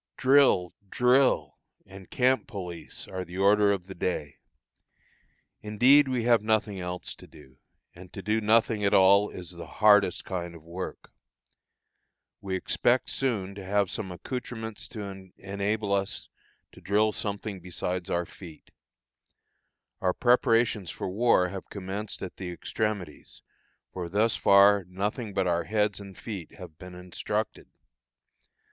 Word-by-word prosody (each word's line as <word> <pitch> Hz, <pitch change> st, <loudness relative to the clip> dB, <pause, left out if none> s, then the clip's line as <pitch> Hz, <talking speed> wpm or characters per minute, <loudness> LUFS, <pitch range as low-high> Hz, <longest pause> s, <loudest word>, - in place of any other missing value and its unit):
Drill! 130 Hz, -10 st, +4 dB, 0.2 s
drill! 125 Hz, +4 st, +2 dB, 0.3 s
and 95 Hz, 0 st, -13 dB
camp 130 Hz, +1 st, +2 dB
police 90 Hz, -7 st, -7 dB
are 95 Hz, -1 st, -5 dB
the 90 Hz, +1 st, -9 dB
order 100 Hz, +1 st, +4 dB
of 95 Hz, -3 st, -2 dB
the 95 Hz, -, -9 dB
day. 80 Hz, -5 st, -3 dB, 1.2 s
Indeed 125 Hz, +7 st, +5 dB
we 125 Hz, -3 st, -1 dB
have 120 Hz, -2 st, +4 dB
nothing 110 Hz, -2 st, 0 dB
else 90 Hz, 0 st, -5 dB
to -, -, -15 dB
do, 65 Hz, 0 st, -18 dB, 0.3 s
and 90 Hz, 0 st, -13 dB
to 100 Hz, -, -8 dB
do 110 Hz, +1 st, +1 dB
nothing 110 Hz, 0 st, +2 dB
at 100 Hz, +1 st, +3 dB
all 100 Hz, +2 st, +6 dB
is 90 Hz, -1 st, -8 dB
the 85 Hz, -1 st, -9 dB
hardest 105 Hz, -4 st, +4 dB
kind 85 Hz, -2 st, -4 dB
of 80 Hz, -, -13 dB
work. 85 Hz, +3 st, -7 dB, 1.3 s
We 95 Hz, -1 st, -3 dB
expect 120 Hz, +6 st, +1 dB
soon 105 Hz, -8 st, -1 dB
to 100 Hz, -1 st, -9 dB
have 100 Hz, 0 st, 0 dB
some 95 Hz, -4 st, -5 dB
accoutrements 110 Hz, +2 st, -6 dB
to 95 Hz, -4 st, -8 dB
enable 100 Hz, +2 st, -2 dB
us 100 Hz, 0 st, -2 dB, 0.4 s
to -, -, -16 dB
drill 105 Hz, +2 st, +2 dB
something 100 Hz, -1 st, -4 dB
besides 90 Hz, 0 st, -4 dB
our 85 Hz, 0 st, 0 dB
feet. 85 Hz, -3 st, -13 dB, 1.3 s
Our 90 Hz, -1 st, +1 dB
preparations 115 Hz, -5 st, +2 dB
for -, -, -4 dB
war 100 Hz, -3 st, +3 dB
have 95 Hz, 0 st, -8 dB
commenced 100 Hz, +2 st, -5 dB
at 95 Hz, -, -7 dB
the 90 Hz, -2 st, -5 dB
extremities; 105 Hz, +2 st, -4 dB, 0.5 s
for 90 Hz, -2 st, -5 dB
thus 105 Hz, +5 st, +2 dB
far 100 Hz, 0 st, +5 dB
nothing 100 Hz, +4 st, -4 dB
but 95 Hz, -, +1 dB
our 85 Hz, -1 st, 0 dB
heads 105 Hz, -2 st, 0 dB
and 100 Hz, -2 st, -11 dB
feet 100 Hz, -8 st, -7 dB
have 85 Hz, -4 st, -12 dB
been 90 Hz, -1 st, -10 dB
instructed. 95 Hz, +4 st, -4 dB
100 Hz, 140 wpm, -27 LUFS, 90-110 Hz, 1.3 s, all